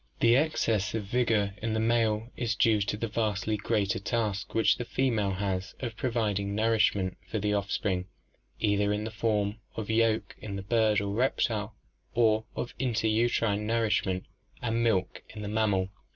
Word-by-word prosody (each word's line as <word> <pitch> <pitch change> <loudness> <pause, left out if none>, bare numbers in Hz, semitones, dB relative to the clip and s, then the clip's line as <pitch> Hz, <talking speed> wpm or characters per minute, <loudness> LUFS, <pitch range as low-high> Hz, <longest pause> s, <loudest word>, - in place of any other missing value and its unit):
The 115 0 +5
excess 115 -8 +1
of 110 - -1
vigor 105 -2 +1
in 110 0 -1
the - - +1
male 115 0 +1
is 115 -3 -1
due 110 -1 +3
to 100 +1 -1
the 115 - -2
vastly 110 -1 -1
greater 100 -2 0
task 105 -1 -2
which 115 - +4
the 120 - -3
female 115 -6 0
has 95 -1 -3
of 120 -4 -4
providing 105 -6 -1
nourishment 105 -4 +2
for 110 - -3
the 105 0 0
offspring, 100 -2 -1 0.5
either 100 -1 +2
in 105 +1 -1
the 110 - -4
form 105 -1 0 0.2
of 110 -1 -3
yolk 110 -1 +1
in 100 -2 -5
bird 110 0 +2
or 100 0 -2
reptile, 110 -3 0 0.4
or 110 -2 +3
of 120 - -4
interuterine 110 -3 +1
nour 115 0 +2
ishment 95 -3 0 0.4
and 115 -1 0
milk 100 -5 0
in 105 -1 -8
the - - -4
mammal. 105 -3 +1
110 Hz, 165 wpm, -29 LUFS, 100-115 Hz, 0.5 s, The